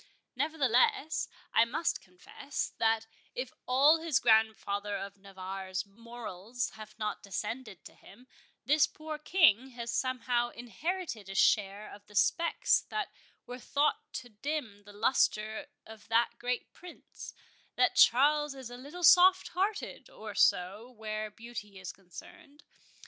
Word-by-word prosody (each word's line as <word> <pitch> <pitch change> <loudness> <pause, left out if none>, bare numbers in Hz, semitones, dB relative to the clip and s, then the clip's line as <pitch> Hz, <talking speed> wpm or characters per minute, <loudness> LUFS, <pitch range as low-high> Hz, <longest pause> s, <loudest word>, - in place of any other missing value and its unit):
Nevertheless, 285 +1 +2 0.3
I - - +6
must 280 +8 -1
confess, 180 +9 -6
that 225 0 +2 0.3
if 250 0 -4
all 280 +6 +5
his 325 -5 +2
grandfather 210 -2 +2
of 200 +1 -7
Navarre's 190 -1 -5
morals 230 +1 -6
have 215 -1 -12
not 215 -1 -3
descended 200 - -5
to - - -11
him, 250 - -17 0.4
this 295 +3 +4
poor 310 -1 -7
King 300 - +4
has 235 -1 -4
somehow 250 -2 0
inherited 240 - -5
a 195 - -6
share 205 +1 +2
of 205 0 -14
the 210 - -16
specks 335 - +3
that 425 -2 -3 0.3
were 245 +1 -8
thought 285 +4 0
to 250 -1 -6
dim 225 -2 -4
the 205 - -13
lustre 215 +2 +1 0.2
of 220 -1 -13
that 230 +2 +3
great 245 0 -3
Prince—that 355 -1 -5
Charles 295 +3 +5
is 260 -3 -9
a 245 - -8
little 295 +8 -9
soft 370 +3 +7
hearted, 395 +4 -2
or 215 -1 -9
so, 195 +6 +2
where 215 -2 -5
beauty 215 -2 -9
is 185 - -6
concerned. 280 - -14
235 Hz, 135 wpm, -31 LUFS, 210-285 Hz, 0.4 s, soft